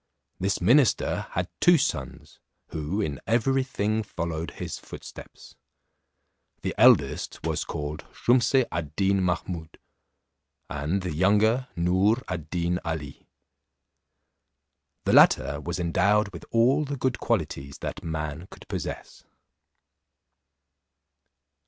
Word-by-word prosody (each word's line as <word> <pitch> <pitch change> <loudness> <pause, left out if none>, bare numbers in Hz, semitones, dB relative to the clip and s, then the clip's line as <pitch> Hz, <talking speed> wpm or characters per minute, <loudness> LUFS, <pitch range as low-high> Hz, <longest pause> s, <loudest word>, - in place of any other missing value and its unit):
This 95 +2 0
minister 130 -1 +3
had - - -1
two 175 -1 +6
sons, 75 - -3 0.3
who 80 +7 -2
in 75 -8 -3
every 135 +4 +2
thing 110 -5 -1
followed 85 -5 -4
his - - -6
footsteps. - - -11 1.1
The - - -1
eldest 100 - +4
was - - -1
called 75 +1 -5
Shumse 125 +1 +3
ad 80 -3 -4
Deen 100 0 +2
Mahummud, 90 -2 -3 0.9
and 75 +7 -1
the 90 -3 -3
younger 105 - +3
Noor 95 +6 +3
ad 85 -5 -5
Deen 90 +1 -1
Ali. 80 -4 -5 1.8
The - - +1
latter 70 +1 +5
was 85 +3 -4
endowed 100 +5 +2
with - - -9
all 125 +6 +3
the 145 -1 -4
good 130 -1 -1
qualities 75 - -2
that - - -5
man 80 +1 -4
could - - -14
possess. - - -6
90 Hz, 110 wpm, -26 LUFS, 80-115 Hz, 1.8 s, two